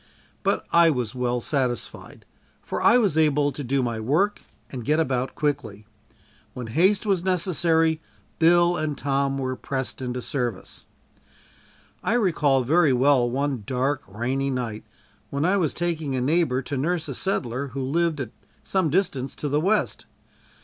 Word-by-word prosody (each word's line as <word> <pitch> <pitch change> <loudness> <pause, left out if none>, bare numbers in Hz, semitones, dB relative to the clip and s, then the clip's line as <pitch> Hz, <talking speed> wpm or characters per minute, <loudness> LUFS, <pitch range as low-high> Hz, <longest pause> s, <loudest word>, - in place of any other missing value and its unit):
But - - 0
I 170 0 +6
was 125 -8 -1
well 125 -1 -1
satisfied, 125 -2 -3 0.4
for - - -4
I 235 - +6
was 200 -10 +2
able 150 -2 +3
to 145 - -6
do 135 +1 0
my 115 -2 -2
work 155 - +1 0.3
and 125 -3 -6
get 150 +6 +2
about 130 -4 -1
quickly. 130 -9 -2 0.7
When 125 - -5
haste 190 - +3
was 195 -4 +1
necessary, 165 -3 +2 0.4
Bill 175 +1 +4
and 155 -2 -2
Tom 140 0 0
were 130 -1 -2
pressed 135 0 -4
into 125 -1 -3
service. 120 -6 -4 1.1
I - - 0
recall 150 - +2
very 155 +2 +4
well 130 -1 +3
one 135 -1 -1
dark 135 +3 0
rainy 125 +7 -2
night 120 -5 -3 0.5
when 140 +2 -1
I 190 +3 +3
was 165 -6 +1
taking 160 -5 -2
a - - 0
neighbor 135 -2 +1
to 140 - -4
nurse 165 +4 -1
a - - -4
settler 140 -8 -2
who 135 +1 -5
lived 160 +3 0
at 125 -5 -4 0.3
some 190 -4 0
distance 140 -6 -1
to 145 - -3
the 145 +2 +1
west. 210 +5 0
140 Hz, 155 wpm, -24 LUFS, 130-165 Hz, 1.1 s, I